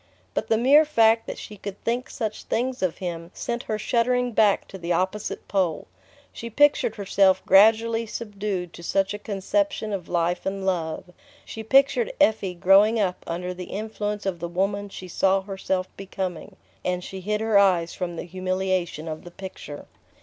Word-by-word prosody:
But -, -, -2 dB
the 225 Hz, -, +3 dB
mere 275 Hz, +6 st, +6 dB
fact 225 Hz, -7 st, +3 dB
that -, -, -5 dB
she 210 Hz, -, -9 dB
could 200 Hz, 0 st, -7 dB
think 240 Hz, +2 st, -1 dB
such 220 Hz, -3 st, -4 dB
things 250 Hz, +2 st, -1 dB
of 185 Hz, -3 st, 0 dB
him 170 Hz, -2 st, -5 dB
sent 235 Hz, 0 st, -3 dB
her 215 Hz, -, 0 dB
shuddering 250 Hz, +3 st, +1 dB
back 215 Hz, -3 st, +3 dB
to 190 Hz, -, -9 dB
the 170 Hz, 0 st, -4 dB
opposite 190 Hz, +4 st, -2 dB
pole. 185 Hz, -5 st, 0 dB, 0.5 s
She 235 Hz, -, -7 dB
pictured 290 Hz, -2 st, +3 dB
herself 195 Hz, -2 st, +2 dB
gradually 225 Hz, +3 st, +5 dB
subdued 200 Hz, -5 st, -4 dB
to -, -, -11 dB
such 195 Hz, +3 st, 0 dB
a 205 Hz, -, -5 dB
conception 215 Hz, +3 st, -1 dB
of 185 Hz, -4 st, -5 dB
life 175 Hz, 0 st, 0 dB
and 195 Hz, 0 st, -3 dB
love, 175 Hz, -2 st, -2 dB, 0.3 s
she 225 Hz, -, -7 dB
pictured 275 Hz, -, +3 dB
Effie 200 Hz, -4 st, +2 dB
growing 200 Hz, +5 st, +5 dB
up 185 Hz, -3 st, -1 dB
under 180 Hz, +2 st, -3 dB
the 180 Hz, 0 st, -7 dB
influence 210 Hz, 0 st, -4 dB
of 185 Hz, -3 st, -2 dB
the 170 Hz, +1 st, -4 dB
woman 200 Hz, +3 st, -1 dB
she 185 Hz, -1 st, -9 dB
saw 190 Hz, +2 st, +2 dB
herself 190 Hz, -1 st, -2 dB
becoming 190 Hz, -3 st, -5 dB, 0.3 s
and 180 Hz, 0 st, -1 dB
she 190 Hz, -, -7 dB
hid 210 Hz, +3 st, -1 dB
her 220 Hz, -2 st, +3 dB
eyes 180 Hz, -4 st, +3 dB
from 175 Hz, -2 st, -4 dB
the -, -, -5 dB
humiliation 185 Hz, -2 st, -2 dB
of 155 Hz, -1 st, -6 dB
the 175 Hz, -, -10 dB
picture... 175 Hz, -5 st, -9 dB
195 Hz, 175 wpm, -25 LUFS, 180-220 Hz, 0.5 s, mere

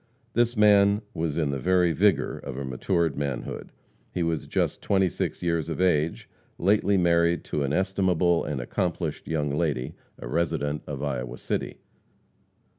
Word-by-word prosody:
This 120 Hz, 0 st, +2 dB
man 105 Hz, 0 st, +5 dB
was 80 Hz, -2 st, -2 dB
in 75 Hz, -4 st, +1 dB
the 70 Hz, -, -2 dB
very 90 Hz, +3 st, +3 dB
vigor 100 Hz, +1 st, +2 dB
of 65 Hz, -, -7 dB
a 70 Hz, -, -4 dB
matured 80 Hz, +4 st, 0 dB
manhood. 70 Hz, -3 st, -4 dB, 0.4 s
He 90 Hz, -, -1 dB
was 80 Hz, -3 st, -1 dB
just -, -, -1 dB
twenty 95 Hz, -2 st, +2 dB
six 90 Hz, -, -3 dB
years 85 Hz, -2 st, 0 dB
of 80 Hz, -, -4 dB
age, 85 Hz, -3 st, +1 dB, 0.3 s
lately 100 Hz, +1 st, +3 dB
married 85 Hz, -1 st, +3 dB
to 75 Hz, -, -3 dB
an 70 Hz, -1 st, 0 dB
estimable 90 Hz, -1 st, +2 dB
and 75 Hz, -3 st, -3 dB
accomplished 80 Hz, +4 st, -3 dB
young 75 Hz, -3 st, -1 dB
lady, 75 Hz, -6 st, -1 dB, 0.2 s
a -, -, -8 dB
resident 75 Hz, 0 st, -1 dB
of 70 Hz, -1 st, -5 dB
Iowa 65 Hz, -3 st, -3 dB
City. -, -, -3 dB
85 Hz, 155 wpm, -26 LUFS, 75-95 Hz, 0.4 s, man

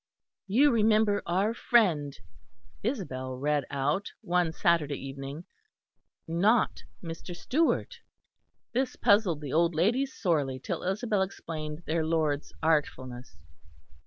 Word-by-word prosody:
"You 270 Hz, +9 st, +5 dB
remember 215 Hz, -2 st, +3 dB
our 195 Hz, +6 st, +1 dB
friend," 170 Hz, -, +2 dB, 0.6 s
Isabel 130 Hz, -, -3 dB
read 145 Hz, +1 st, 0 dB
out 145 Hz, +8 st, -1 dB
one 175 Hz, -1 st, +1 dB
Saturday 160 Hz, -4 st, +1 dB
evening, 135 Hz, +3 st, -7 dB, 0.8 s
"not 200 Hz, +8 st, +2 dB, 0.2 s
Mr. 165 Hz, +1 st, -7 dB
Stewart." 330 Hz, -, 0 dB, 0.7 s
(This 255 Hz, +1 st, 0 dB
puzzled 200 Hz, -7 st, +3 dB
the 145 Hz, -3 st, -5 dB
old 170 Hz, +1 st, +3 dB
ladies 240 Hz, +11 st, +2 dB
sorely 145 Hz, -9 st, 0 dB
till 130 Hz, -, -4 dB
Isabel 205 Hz, +2 st, 0 dB
explained 160 Hz, -4 st, -5 dB
their 160 Hz, +1 st, 0 dB
lord's 155 Hz, -2 st, 0 dB
artfulness.) 130 Hz, -6 st, -1 dB
170 Hz, 105 wpm, -29 LUFS, 145-210 Hz, 0.8 s, You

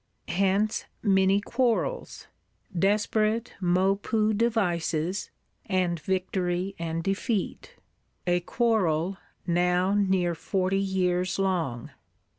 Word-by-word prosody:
Hence 195 Hz, +4 st, +1 dB, 0.2 s
many 195 Hz, -1 st, +4 dB
quarrels; 255 Hz, -, -1 dB, 0.5 s
desperate 215 Hz, +4 st, +1 dB
Maupeou 195 Hz, +4 st, +2 dB
devices, 185 Hz, -6 st, 0 dB, 0.4 s
and 180 Hz, -3 st, 0 dB
victory 185 Hz, +2 st, -1 dB
and 165 Hz, 0 st, -3 dB
defeat;—a 195 Hz, -3 st, -3 dB
quarrel 190 Hz, -4 st, +1 dB, 0.3 s
now 180 Hz, +2 st, +2 dB
near 190 Hz, -4 st, +2 dB
forty 190 Hz, +3 st, 0 dB
years 185 Hz, -2 st, 0 dB
long. 170 Hz, -11 st, -1 dB
190 Hz, 80 wpm, -27 LUFS, 175-205 Hz, 0.5 s, many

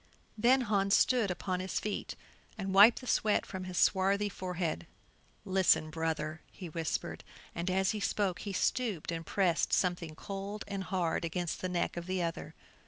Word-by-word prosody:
Then 245 Hz, +4 st, +4 dB
Hans 200 Hz, -3 st, +3 dB
stood 245 Hz, -6 st, +3 dB
upon 180 Hz, +1 st, -2 dB
his 185 Hz, +1 st, -2 dB
feet, 210 Hz, -1 st, -4 dB, 0.4 s
and 195 Hz, -2 st, -3 dB
wiped 210 Hz, +6 st, +7 dB
the -, -, -10 dB
sweat 215 Hz, -3 st, +2 dB
from 185 Hz, -1 st, -6 dB
his 180 Hz, -1 st, -5 dB
swarthy 200 Hz, +1 st, +3 dB
forehead. 180 Hz, -4 st, -3 dB, 0.6 s
"Listen, 185 Hz, -5 st, +3 dB
brother," 160 Hz, -1 st, -2 dB
he 180 Hz, -3 st, -8 dB
whispered, 160 Hz, 0 st, -3 dB, 0.3 s
and 170 Hz, +2 st, -3 dB
as 190 Hz, 0 st, +2 dB
he 215 Hz, -, -3 dB
spoke 195 Hz, -2 st, 0 dB
he 205 Hz, -, -5 dB
stooped 200 Hz, -3 st, -1 dB
and 165 Hz, 0 st, -4 dB
pressed 175 Hz, -1 st, +1 dB
something 175 Hz, -4 st, 0 dB
cold 200 Hz, +4 st, -6 dB
and 195 Hz, -2 st, -4 dB
hard 175 Hz, -4 st, -1 dB
against 170 Hz, 0 st, -3 dB
the 185 Hz, -, -2 dB
neck 175 Hz, -1 st, -1 dB
of 175 Hz, 0 st, -5 dB
the 185 Hz, -1 st, -1 dB
other. 165 Hz, -1 st, -4 dB
185 Hz, 170 wpm, -32 LUFS, 170-200 Hz, 0.6 s, wiped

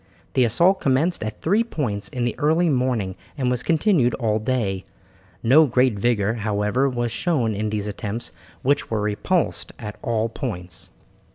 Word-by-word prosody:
The 130 Hz, -, +4 dB
assault 180 Hz, -, +3 dB
commenced 145 Hz, +7 st, +1 dB
at 110 Hz, 0 st, -5 dB
three 205 Hz, +8 st, +3 dB
points 120 Hz, -, -2 dB
in 125 Hz, -1 st, -2 dB
the 120 Hz, -, 0 dB
early 160 Hz, +3 st, +3 dB
morning 125 Hz, -8 st, 0 dB, 0.2 s
and 130 Hz, -3 st, +1 dB
was 125 Hz, -1 st, 0 dB
continued 155 Hz, -, +2 dB
all 110 Hz, -3 st, 0 dB
day. 105 Hz, -5 st, -1 dB, 0.6 s
No 145 Hz, +7 st, +6 dB
great 125 Hz, 0 st, +3 dB
vigour, 105 Hz, 0 st, +1 dB
however, 105 Hz, +5 st, +1 dB
was 120 Hz, -2 st, -2 dB
shown 125 Hz, -6 st, 0 dB
in 105 Hz, +1 st, -2 dB
these 105 Hz, -1 st, -2 dB
attempts 105 Hz, +2 st, -4 dB, 0.3 s
which 140 Hz, +2 st, +1 dB
were 110 Hz, -, 0 dB
repulsed 105 Hz, -, -1 dB
at 105 Hz, -2 st, -7 dB
all 115 Hz, -1 st, 0 dB
points. 95 Hz, -7 st, -4 dB
120 Hz, 160 wpm, -23 LUFS, 105-140 Hz, 0.6 s, No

